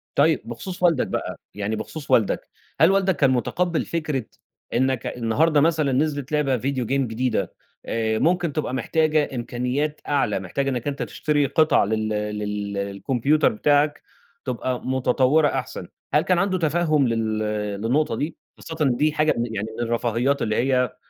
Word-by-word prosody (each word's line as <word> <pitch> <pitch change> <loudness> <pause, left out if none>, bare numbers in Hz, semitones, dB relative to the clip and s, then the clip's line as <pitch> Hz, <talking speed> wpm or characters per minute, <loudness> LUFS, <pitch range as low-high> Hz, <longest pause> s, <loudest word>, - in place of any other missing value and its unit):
طيب، 155 0 +3
بخصوص 180 +11 -7
والدك 165 -6 +3
بقى - - -4
يعني 105 +2 -2
بخصوص 150 +7 -7
والدك، 110 -4 +2 0.3
هل 160 +4 +7
والدك 195 -1 +2
كان 140 -2 +3
متقبّل 170 +7 0
فكرة 155 -7 -2 0.5
إنّك 130 -1 +1
أ - - -4
النهارده 145 +7 +2
مثلًا 155 -3 +2
نزلت 145 0 -1
لعبة 145 -4 +1
video 130 +1 -2
game 135 0 +1
جديدة 120 +3 -1 0.3
آآ، 110 -1 -1
ممكن 175 -2 +1
تبقى 150 -4 -2
محتاجة 155 +3 +1
إمكانيات 125 +5 -2
أعلى، 135 -9 +1
محتاجة 115 +9 -2
إنّك 125 0 -3
أنت 140 -2 -2
تشتري 145 +5 0
قطع 155 0 +3
لل 110 +1 -1
لل 105 -1 -3
للcomputer 140 +4 +2
بتاعك، 145 +5 +2 0.4
تبقى 125 -1 -2
متطوّرة 130 +3 +3
أحسن، 135 -2 -4 0.3
هل - - +5
كان 185 - +1
عنده 190 0 +1
تفهُّم 155 -4 +2
لل 110 -2 -1 0.4
للنقطة 130 +3 +1
دي؟ 150 +8 -3 0.2
خاصةً 160 -1 -8 0.2
دي 155 +1 +2
حاجة 155 0 +2
من 115 -1 -2
يعني 105 +1 -2
من - - 0
الرفاهيات، 120 +4 0
اللي 110 -1 0
هي 125 0 +1
135 Hz, 155 wpm, -23 LUFS, 115-155 Hz, 0.5 s, هل